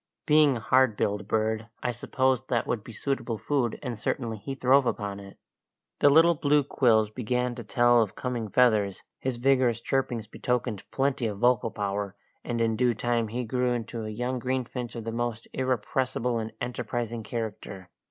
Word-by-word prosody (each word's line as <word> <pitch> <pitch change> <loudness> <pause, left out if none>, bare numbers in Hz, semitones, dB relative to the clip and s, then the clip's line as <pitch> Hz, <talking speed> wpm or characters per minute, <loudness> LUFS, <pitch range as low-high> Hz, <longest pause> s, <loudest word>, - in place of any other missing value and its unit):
Being 150 -4 +5
a - - -5
hard 130 -1 +3
billed 105 0 -1
bird, 110 +1 0 0.2
I 125 - +1
supposed 130 +1 0
that 120 -3 0
would 115 -4 -2
be 115 - -10
suitable 120 -1 -2
food, 130 -1 0
and 120 -5 -4
certainly 115 -2 -2
he 135 +6 -5
throve 130 0 +4
upon 100 -3 -2
it. 100 0 -12 0.6
The 145 - +6
little 165 +4 +6
blue 145 -1 +2
quills 110 -6 +3
began 125 +1 -1
to 120 -1 -7
tell 120 +3 +4
of 105 -4 -2
coming 120 -4 -3
feathers, 105 -4 +2 0.2
his 130 -2 -2
vigorous 125 -2 +3
chirpings 120 -3 -1
betokened 120 -1 -2
plenty 135 -3 0
of 105 -2 -4
vocal 120 +1 +3
power, 100 -1 -3 0.3
and 120 -1 -2
in 115 -1 +2
due 120 0 +2
time 120 +1 0
he 120 +4 -3
grew 125 +1 0
into 115 -1 -4
a 110 - -4
young 125 +4 -2
greenfinch 125 -1 -3
of 115 - -5
the 115 - -4
most 115 -1 -3
irrepressible 125 -1 -1
and 110 0 -4
enterprising 120 -1 -3
character. 105 -5 -6
120 Hz, 175 wpm, -27 LUFS, 110-130 Hz, 0.6 s, The